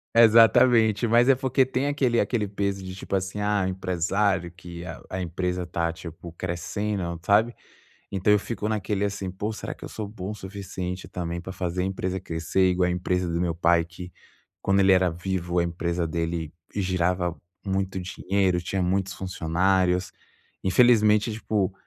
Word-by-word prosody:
Exatamente, 115 -1 +6
mas 120 +3 +4
é 135 - +7
porque 130 0 +2
tem 130 +2 -1
aquele 130 -5 +1
aquele 105 0 0
peso 100 -1 -2
de 95 0 -6
tipo 100 +1 -4
assim: 95 +2 -2
“Ah, 105 -1 +1
o 95 - 0
empresário 95 0 0
que 85 -1 -10 0.3
a 95 0 -3
empresa 90 +1 -2
está 85 -1 -1 0.5
crescendo, 90 0 -3
sabe?”. 110 +4 +3 0.5
Então 100 +1 +1
eu 105 - +5
fico 110 0 -4
naquele 105 -1 -1
assim: 100 -2 -2
pô, 100 +4 -3
será 105 - -5
que - - -14
eu - - -7
sou 110 -2 -5
bom 100 -1 -6
o - - -6
suficiente 95 -2 -6
também 85 -1 -4
para 95 - -7
fazer 90 -1 -2
a - - 0
empresa 95 0 -2
crescer 85 +3 +1
igual 90 0 +2
a - - 0
empresa 90 0 -1
do 85 +1 -1
meu 85 -2 0
pai, 85 0 +3
que 90 +2 -10 0.5
quando 100 0 +2
ele 95 0 +6
era 95 -1 +4
vivo 90 0 -2
a - - +3
empresa 85 0 -2
dele 85 -1 -3 0.2
girava 90 -2 0 0.3
muito 95 -1 -1
dinheiro, 95 0 0
tinha 95 +2 -2
muitos 95 +1 0
funcionários? 90 +1 +1 0.5
Infelizmente, 105 +1 +4
tipo, 105 -3 -1
95 Hz, 165 wpm, -25 LUFS, 90-105 Hz, 0.5 s, é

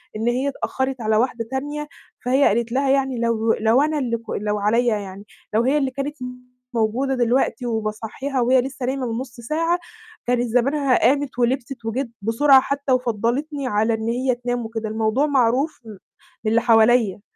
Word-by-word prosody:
إن 220 +2 -2
هي 250 +3 +1
اتأخّرت 265 -2 -3
على 215 -1 +1
واحدة 230 -1 0
تانية، 290 +3 -3 0.4
فهي 260 +3 +3
قالت 230 +2 0
لها 270 +2 +1
يعني 265 -2 +1
لو 230 -1 +1
لو 225 +4 +3
أنا 305 0 0
اللي 240 -4 -1
ك 230 - -17
لو 210 0 -2
عليَّ 230 +4 +2
يعني، 200 -3 -3 0.3
لو 220 +2 +3
هي 270 +4 +2
اللي 270 -3 0
كانت 275 +3 -4 0.6
موجودة 240 +4 0
دلوقتي 245 0 +1
وباصَحّيها 225 +4 -3
وهي 250 +2 +4
لسه 260 0 -5
نايمة 260 0 -2
من 225 - -2
نُصّ 255 -3 -8
ساعة، 330 +8 0 0.5
كانت 245 0 +2
زمانها 260 +3 +2
قامِت 275 +1 +1
ولبسِت 245 0 -1
وجِت 240 +3 -2
بسرعة 265 +6 +5
حتى 280 0 -2
وفضّلتني 255 +4 -1
على 220 0 +1
إن 220 0 -2
هي 250 +2 0
تنام 245 -1 -3
وكده، 225 -1 -4
الموضوع 220 +5 +1
معروف 270 +2 +1
م - - -10
من 205 -3 -10 0.5
اللي 230 +1 +3
حواليّا، 225 -3 +4
245 Hz, 175 wpm, -22 LUFS, 225-270 Hz, 0.6 s, بسرعة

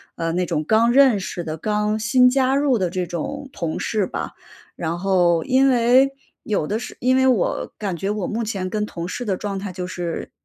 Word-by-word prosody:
呃， 165 -1 -2
那 180 +1 0
种 160 -3 -1
刚 220 +7 +3
认 260 -4 +5
识 180 -2 -5
的， 155 0 -5
刚 210 +4 0
新 250 +3 +4
加 265 +1 +2
入 280 -4 +2
的 185 -3 -1
这 180 -1 -2
种 270 - -5
同 165 -8 -4
事 210 -4 0
吧。 - - -5 0.4
然 170 +1 -3
后 175 -4 +2
因 265 +1 +4
为 255 +2 +4 0.3
有 200 -8 -1
的 215 - -1
是 220 - -7
因 255 +1 +2
为 260 - +3
我 250 -8 +1
感 195 -5 -3
觉 195 +5 -2
我 210 -3 -2
目 225 +2 -2
前 195 -4 -3
跟 210 +2 -1
同 170 -4 -6
事 245 +7 -5
的 200 -4 0
状 200 -2 -4
态 195 -1 -5
就 180 0 -5
是 175 -2 -5
210 Hz, 230 characters per minute, -21 LUFS, 180-245 Hz, 0.4 s, 认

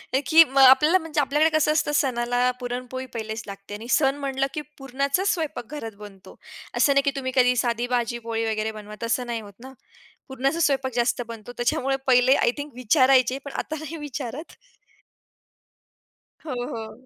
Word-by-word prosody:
हं 270 - +2
की 325 +1 +8
अ, 275 -3 -1
आपल्याला 300 +7 +7
म्हणजे 320 -2 -1
आपल्याकडे 295 +4 +2
कसं 305 0 +2
असतं 305 -1 +1
सणाला 245 -2 0 0.2
पुरणपोळी 250 +1 -5
पहिलेच 220 -1 -5
लागते 200 0 -9
आणि 220 +3 -9
सण 275 -2 +2
म्हटलं, 270 0 -1
की 300 - -3 0.2
पुरणाचाच 275 +8 0
स्वयंपाक 315 -7 -4
घरात 225 -5 -7
बनतो. 195 -2 -13 0.4
असं 280 - +4
नाही 275 0 +3
की 280 - +2
तुम्ही 260 -1 -3
कधी 250 -1 +4
साधी 240 0 -1
भाजी-पोळी 230 -1 -2
वगैरे 220 0 -2
बनवा, 210 0 -10
तसं 235 +2 0
नाही 230 -2 -3
होत 205 -1 -13
ना. 265 - -12 0.5
पुरणाचा 270 +4 -1
स्वयंपाक 270 -2 0
जास्त 245 0 +1
बनतो 230 0 -9
त्याच्यामुळे 255 +2 0
पहिले 255 +1 +5
आय 235 - +3
थिंक 290 0 -7
विचारायचे, 255 0 +3
पण 280 - -6
आता 310 - -6
नाही 320 +1 -7
विचारत. 280 +2 -7 1.9
हो, 305 - -5
हो. 245 0 -6
255 Hz, 170 wpm, -24 LUFS, 235-280 Hz, 1.9 s, की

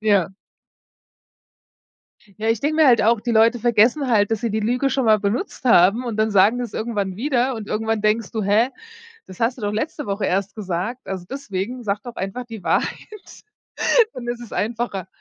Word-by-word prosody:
Ja. 200 -4 +2 2.1
Ja, 220 - -1
ich 225 -1 +1
denke 310 +2 0
mir 315 -2 +6
halt 240 -2 +5
auch, 230 +1 +3
die 235 +2 -3
Leute 230 +2 +4
vergessen 240 +5 +3
halt, 215 -3 +2
dass 220 - 0
sie 235 - -2
die 215 +1 -1
Lüge 250 +5 0
schon 265 0 0
mal 215 -1 +4
benutzt 220 - -3
haben 225 +1 +5
und 235 -3 -3
dann 215 0 +1
sagen 200 +4 +5
sie 245 - -3
das 235 - -7
irgendwann 205 -4 -3
wieder 260 0 0
und 215 -3 -7
irgendwann 220 +1 -1
denkst 215 0 0
du: 220 - -2
„Hä? 210 +5 +2 0.6
Das 185 - -12
hast 235 +3 0
du - - -10
doch 205 0 -1
letzte 295 +7 -3
Woche 200 +1 -2
erst 195 +3 -1
gesagt." 195 +5 -4
Also 190 -2 -5
deswegen, 245 -2 -5
sag 205 0 -2
doch 240 -1 -9
einfach 195 +6 -4
die 225 -4 -10
Wahrheit. 425 -3 -3 0.7
Dann 240 - -7
ist 240 0 -4
es 235 - -11
einfacher. 220 -4 -3
225 Hz, 195 wpm, -21 LUFS, 205-245 Hz, 2.1 s, mir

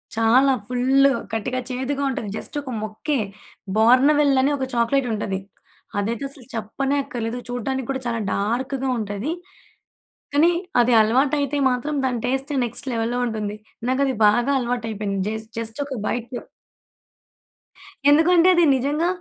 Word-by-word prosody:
చాలా 235 +5 +4 0.2
ఫుల్లు 265 +3 +3 0.2
ఖటిక, 225 +3 -2
చేదుగా 265 +2 -2
ఉంటది. 230 -5 -4
జస్ట్ - - -5
ఒక 270 -2 -7
ముక్కే, 215 +7 -2 0.6
బార్న్‌వెల్ 275 +5 +5
అని 275 +2 +2
ఒక 265 - -2
చాక్లెటుంటది. 230 -5 0 0.6
అదైతే 225 +5 -2
అసలు 270 -3 -12
చెప్పనే 265 +6 -2
అక్కర్లేదు. 235 -1 -4
చూడడానికి 250 +1 -3
కూడా 265 -1 -3
చాలా 230 -1 -1
డార్క్‌గా 260 +6 -1
ఉంటది. 205 +6 -3 1.0
కానీ 315 +4 +5 0.3
అది 240 +1 +3
అలవాటయితే 275 +5 +1
మాత్రం 250 +5 -2
దాని 250 -2 -1
టేస్ట్ 270 +3 -1
నెక్స్ట్ 240 +3 -4
లెవెల్‌లో 230 +2 -1
ఉంటుంది. 210 -2 -4 0.3
నాకది 265 0 +1
బాగా 240 +6 +2
అలవాటైపోయింది. 220 -5 -2
జేస్ 220 0 -5
జస్ట్ 230 +4 -4
ఒక 270 -3 -5
బైటు 240 +1 -3 1.7
ఎందుకంటే 330 +4 +5
అది 345 - +4
నిజంగా 290 +6 0
250 Hz, 125 wpm, -22 LUFS, 225-275 Hz, 1.7 s, బార్న్‌వెల్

